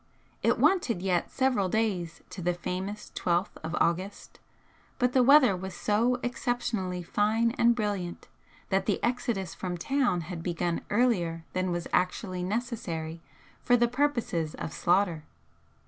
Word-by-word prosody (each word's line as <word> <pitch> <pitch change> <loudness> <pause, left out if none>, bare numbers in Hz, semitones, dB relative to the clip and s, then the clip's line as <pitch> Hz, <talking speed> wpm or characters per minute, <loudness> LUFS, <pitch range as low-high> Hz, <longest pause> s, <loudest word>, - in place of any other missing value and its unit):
It - - +3
wanted 240 - +2
yet 180 -3 +1
several 250 -8 +1
days 185 -6 -1
to 185 - -7
the 175 0 0
famous 190 +4 -5
Twelfth 175 +2 -1
of 160 +2 -3
August, 185 +4 -1 0.6
but 250 -1 +1
the 260 - +5
weather 260 -5 +6
was 190 0 -6
so 235 +6 +1
exceptionally 235 -7 -2
fine 220 +6 +1
and 235 0 +3
brilliant 200 -6 -3 0.4
that 190 0 +1
the 205 - +1
exodus 235 -7 -1
from 180 -2 -4
town 245 -1 +1
had 170 0 -6
begun 170 0 -1
earlier 180 -8 +1
than 185 0 0
was 175 -1 -2
actually 180 0 0
necessary 180 -6 -3 0.4
for 245 - +4
the 240 0 +3
purposes 235 - 0
of 160 - -5
slaughter. 175 -3 +1
195 Hz, 140 wpm, -28 LUFS, 175-235 Hz, 0.6 s, weather